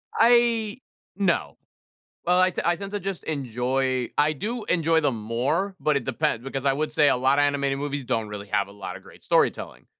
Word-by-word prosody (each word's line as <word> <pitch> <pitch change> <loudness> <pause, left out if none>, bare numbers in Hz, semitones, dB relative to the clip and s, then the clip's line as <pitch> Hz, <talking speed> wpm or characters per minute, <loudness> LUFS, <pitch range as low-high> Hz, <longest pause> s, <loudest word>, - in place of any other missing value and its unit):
I 235 -1 +3 0.4
no. 170 - 0 0.7
Well, 180 +1 +3
I 185 0 +4
te - - -3
I 175 0 +2
tend 195 +3 -7
to 205 - -2
just 195 -1 -4
enjoy 130 -2 -1
I 150 +1 +4
do 220 - -4
enjoy 165 -1 +2
them 135 -7 -1
more, 150 - -1
but 150 -2 +2
it 135 - -1
depends, 115 +1 -1
because 135 0 -4
I 135 - +4
would 150 +2 -2
say 150 -1 +4
a - - +3
lotta 135 +3 +3
animated 140 -1 +1
movies 145 -1 -3
don't 115 -2 -1
really 105 -1 -7
have 100 0 0
a 100 - -13
lotta 95 -2 -7
great - - -17
storytelling; - - 0
145 Hz, 200 wpm, -25 LUFS, 125-180 Hz, 0.7 s, I